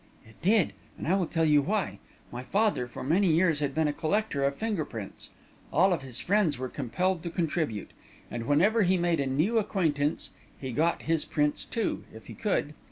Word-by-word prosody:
"It 110 - -19
did; 200 +1 +3 0.2
and - - -5
I 175 - +3
will 185 -4 0
tell 165 -1 +1
you 150 -2 +5
why. 200 +5 -1 0.3
My 120 - -5
father, 200 - +1
for 120 - -8
many 170 +6 +3
years, 165 -2 +3
had 140 -2 -2
been 160 -1 +2
a 145 - 0
collector 160 -2 0
of 140 0 +1
finger 215 -5 -1
prints. 110 -8 -8 0.4
All 190 -1 +4
of 165 - -2
his 130 -3 -7
friends 190 -6 +2
were 130 0 -4
compelled 165 +9 -1
to 170 - -4
contribute; 160 - -2 0.4
and 115 -1 -4
whenever 195 +11 +4
he 185 -1 +3
made 170 -2 +1
a 140 - 0
new 160 - +2
acquaintance, 160 -8 -1 0.3
he 130 -2 -5
got 160 +8 +1
his 160 -1 +1
prints, 150 -1 0
too, 230 - -2
if 110 0 -12
he - - -9
could. 190 -8 -1
160 Hz, 200 wpm, -28 LUFS, 140-190 Hz, 0.4 s, you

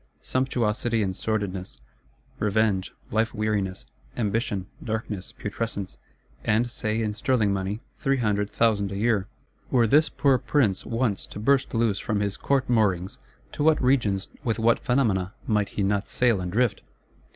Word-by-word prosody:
Sumptuosity 120 -3 0
and 95 -1 -2
sordidness; 95 - -3 0.6
revenge, 105 -2 +1 0.2
life 110 +2 +1
weariness, 100 - -1 0.3
ambition, 105 -3 -1 0.2
darkness, 110 -4 -4
putrescence; 100 - -4 0.4
and, 115 +3 +1
say, 110 -1 -1
in 105 -1 -1
sterling 110 -2 +1
money, 100 +3 -2 0.2
three 135 -2 +1
hundred 105 -4 0
thousand 105 -3 +1
a - - -4
year,—were 115 +2 -1
this 150 +7 +4
poor 135 -3 +2
Prince 115 -11 +1
once 115 -3 -1
to - - -8
burst 135 +3 +2
loose 115 -3 +2
from 105 -1 -1
his 100 -1 0
Court 135 +4 0
moorings, 100 -6 +1 0.3
to - - -2
what 155 0 +4
regions, 110 -7 +1
with 115 -2 0
what 115 +1 +3
phenomena, 105 -7 +1
might 105 -2 +1
he 100 - -2
not 100 +1 0
sail 120 -6 +2
and 90 -1 -4
drift! 115 0 +1
110 Hz, 145 wpm, -26 LUFS, 100-120 Hz, 0.6 s, this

